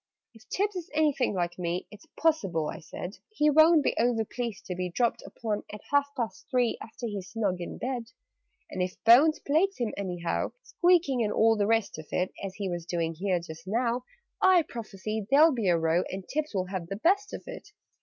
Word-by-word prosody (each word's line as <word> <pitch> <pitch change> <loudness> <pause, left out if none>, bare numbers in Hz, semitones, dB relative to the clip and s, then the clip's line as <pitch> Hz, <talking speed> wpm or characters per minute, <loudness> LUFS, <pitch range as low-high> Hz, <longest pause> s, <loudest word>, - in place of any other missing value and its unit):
"If 225 +1 -19
Tibbs 405 +1 0
is 360 -1 -5
anything 290 -8 +2
like 175 -1 -2
me, 175 +1 -2
It's 210 -1 -14
possible," 195 - +1
I - - -8
said, 180 +3 -8
"He 300 -9 +2
won't 315 +1 +6
be - - +1
over 230 -1 +2
pleased 235 -2 -5
to 180 - -3
be 180 0 -2
Dropped 235 +6 0
in - - -11
upon 215 -3 -3
at 210 - -8
half 285 0 +4
past 235 -3 -4
three, 245 -3 +2
After 225 +2 -8
he's 200 -4 -5
snug 200 -6 -1
in 175 - -6
bed. 250 -2 -3 0.7
"And 185 - -3
if 180 0 -2
Bones 270 +8 +7
plagues 350 +7 +2
him 240 -4 -2
anyhow 180 -3 -2
Squeaking 340 -9 +2
and 210 - 0
all 225 +1 +4
the 205 -1 +1
rest 225 -7 +1
of 155 - -10
it, 180 +1 0
As 195 -1 -5
he 200 -1 -3
was 175 -2 -4
doing 165 -1 -1
here 185 +2 0
just 165 +1 -10
now 235 +3 0 0.4
I 370 -3 +6
prophesy 215 -5 -5
there'll 300 +3 +6
be 230 -6 -1
a 170 - +4
row, 165 +2 +2
And 190 0 -6
Tibbs 300 -4 -3
will 185 -1 0
have 185 -2 -5
the 195 - -4
best 395 - +2
of - - -7
it!" - - -9
220 Hz, 210 wpm, -28 LUFS, 185-280 Hz, 0.7 s, Bones